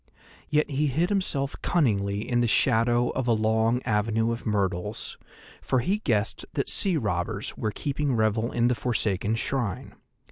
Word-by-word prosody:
Yet 150 0 +2
he 145 +2 +1
hid 160 +7 +1
himself 150 -9 0
cunningly 105 - +1
in 120 -1 +1
the 120 - +2
shadow 120 +1 +2
of 130 -2 -2
a 120 - +4
long 110 +2 +1
avenue 110 +1 +1
of 115 0 -5
myrtles, 100 -1 -2 0.5
for 130 - 0
he 195 - 0
guessed 110 - -1
that - - -1
sea 185 -4 +2
robbers 105 - -2
were 110 - -2
keeping 140 +3 -2
revel 110 +1 +1
in 120 0 +2
the 125 - +3
forsaken 110 -3 -1
shrine. 115 -4 -3
115 Hz, 155 wpm, -26 LUFS, 105-135 Hz, 0.5 s, a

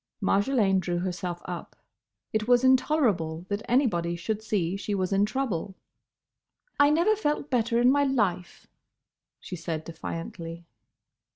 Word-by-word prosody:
Marjolaine 200 -3 +2
drew 175 -1 -2
herself 180 -1 -4
up. 175 -1 -7 0.6
It 215 0 0
was 245 0 +4
intolerable 230 - +2
that 205 +1 -2
anybody 185 -10 +2
should 215 +5 -3
see 195 -5 -1
she 205 +1 -3
was 185 0 -1
in 200 +1 +3
trouble. 205 -7 -2 1.0
"I 285 0 +6
never 340 +8 +3
felt 300 -8 -2
better 235 -1 +2
in 245 +1 +5
my 285 +1 +3
life," 205 -10 -1 0.7
she 185 - -7
said 165 -2 -4
defiantly. 165 0 -7
200 Hz, 130 wpm, -27 LUFS, 175-255 Hz, 1.0 s, I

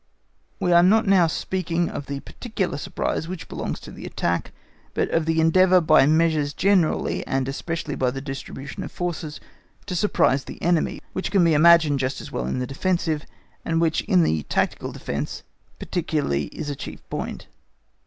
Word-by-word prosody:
We 185 -3 +1
are 170 0 +7
not 215 +6 +4
now 190 -4 +5
speaking 175 0 -1
of 145 - -6
the 140 -1 -4
particular 195 - -4
surprise 160 - -2
which 185 -1 -6
belongs - - -4
to - - -10
the - - -8
attack, 85 0 -2 0.4
but - - 0
of 165 -1 +1
the 160 0 +2
endeavour 185 +3 +5
by 155 -4 +5
measures 155 -2 +2
generally, 190 -5 +2
and 135 0 0
especially 155 +2 -3
by 130 -2 +1
the 135 +2 -4
distribution 135 0 -7
of - - -6
forces, 165 -4 -4 0.5
to 185 - -4
surprise 140 -8 +2
the - - -9
enemy, 175 -1 +1
which 190 - -2
can 190 -2 +3
be 165 -1 +4
imagined 155 -2 +6
just 130 0 -2
as - - -9
well 60 - -3
in 65 - -2
the 125 - -1
defensive, 160 +2 -1 0.4
and 165 0 0
which 165 -1 +2
in 90 - +4
the 80 -1 +1
tactical - - -1
defence 70 +1 -5 0.3
particularly 150 - -1
is - - -7
a - - -4
chief - - -9
point. - - -4
160 Hz, 175 wpm, -24 LUFS, 140-175 Hz, 0.5 s, are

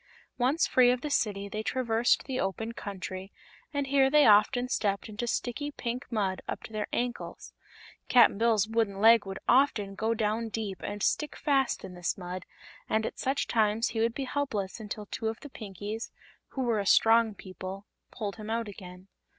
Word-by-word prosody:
Once 270 +7 +3
free 250 -1 +5
of 250 0 +1
the 300 - -4
City 200 -6 0
they 215 +2 -4
traversed 235 0 +1
the 260 -1 -3
open 220 +4 -2
country, 195 -3 -6 0.4
and 285 -2 -1
here 270 -1 +4
they 300 0 +6
often 220 +4 +5
stepped 200 -5 -1
into 220 +3 -4
sticky 250 +5 -2
pink 250 -2 -5
mud 195 -4 -1
up - - -4
to 220 - -10
their 210 -1 -2
ankles. 245 0 -4 0.6
Cap'n 240 -4 +6
Bill's 225 -3 +3
wooden 220 -3 0
leg 225 -1 +6
would 195 0 -5
often 240 -6 +3
go 220 +3 0
down 220 +1 -1
deep 210 -4 -4
and 205 0 -4
stick 300 - 0
fast 270 -3 +1
in 190 -1 -8
this 175 -1 -2
mud, 180 0 -6 0.4
and 220 0 +1
at - - -5
such 270 +2 0
times 220 0 +2
he 225 - -3
would 230 +1 +1
be 275 - -2
helpless 250 -8 -2
until 210 -1 -6
two 220 +2 -4
of 225 +1 -3
the 290 - -9
Pinkies 210 +1 -6 0.4
who 265 - -3
were 230 -3 +1
a 200 - -2
strong 225 0 +5
people 190 +1 -8 0.2
pulled 205 -3 -5
him 215 0 -7
out 230 0 -1
again. 185 -2 -11
225 Hz, 185 wpm, -29 LUFS, 200-245 Hz, 0.6 s, they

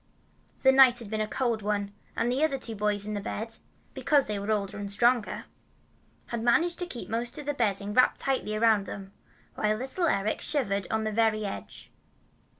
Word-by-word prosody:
The 265 - +7
night 265 -2 +7
had 225 -4 -4
been 215 0 -1
a 215 - -1
cold 235 -1 -1
one, 205 -1 -2 0.2
and 240 - 0
the 265 +4 +1
other 295 -3 +2
two 235 -3 -2
boys 205 -1 0
in 215 - -4
the 205 - -3
bed, 225 +3 -4 0.4
because 290 -3 +3
they 210 -1 -3
were 200 +2 -5
older 205 -1 -1
and 200 -1 -4
stronger, 240 +2 +1 0.8
had 235 -1 -4
managed 335 +10 +2
to 355 - -2
keep 245 -8 -6
most 235 +4 -3
of 295 - -7
the 290 - -1
bedding 205 -5 -1
wrapped 255 +3 +4
tightly 260 -6 -1
around 215 -2 +3
them, 195 0 -8 0.4
while 215 0 +1
little 270 +9 -1
Eric 200 -5 0
shivered 200 - 0
on 220 0 0
the 215 - -1
very 215 -1 +1
edge. 195 - -7
220 Hz, 195 wpm, -28 LUFS, 205-255 Hz, 0.8 s, The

